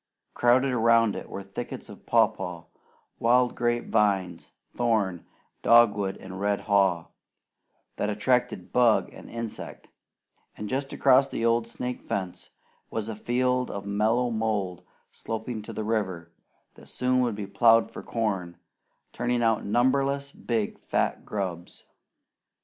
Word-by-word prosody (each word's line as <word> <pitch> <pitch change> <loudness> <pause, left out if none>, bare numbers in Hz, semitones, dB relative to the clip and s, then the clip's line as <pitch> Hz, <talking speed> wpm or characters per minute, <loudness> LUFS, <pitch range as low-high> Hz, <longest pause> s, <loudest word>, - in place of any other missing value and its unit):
Crowded 130 +3 +3
around 115 -2 +3
it - - -7
were 100 - -6
thickets 100 0 -7
of - - -13
papaw, 85 -2 +1 0.6
wild 125 +1 +3
grape 120 0 -1
vines, 95 -4 +1 0.3
thorn, 110 -7 0 0.3
dogwood, 105 -5 +4
and 95 0 -9
red 100 0 0
haw, 95 -5 +2 0.9
that 105 - -1
attracted 125 +4 0
bug 120 -3 +3
and - - -12
insect; 115 -2 -7 0.7
and 105 - -5
just 135 +4 -2
across 135 0 +4
the 115 - -3
old 115 0 +2
snake 125 +1 -5
fence 95 -2 -5 0.4
was 110 -1 -3
a 110 - -4
field 125 +3 0
of 100 0 -6
mellow 110 +4 +1
mould 105 -5 -2 0.3
sloping 110 0 -5
to 105 - -9
the 110 - -4
river, 95 -6 -2 0.4
that - - -17
soon 125 0 +1
would 120 -4 +1
be 105 -1 -5
plowed 115 +4 +4
for - - -8
corn, 95 -7 -2 0.6
turning 120 -1 0
out 115 -2 +2
numberless 135 +5 +1
big 115 -6 -3
fat - - -1
grubs. 90 -4 -5
110 Hz, 135 wpm, -27 LUFS, 100-120 Hz, 0.9 s, dogwood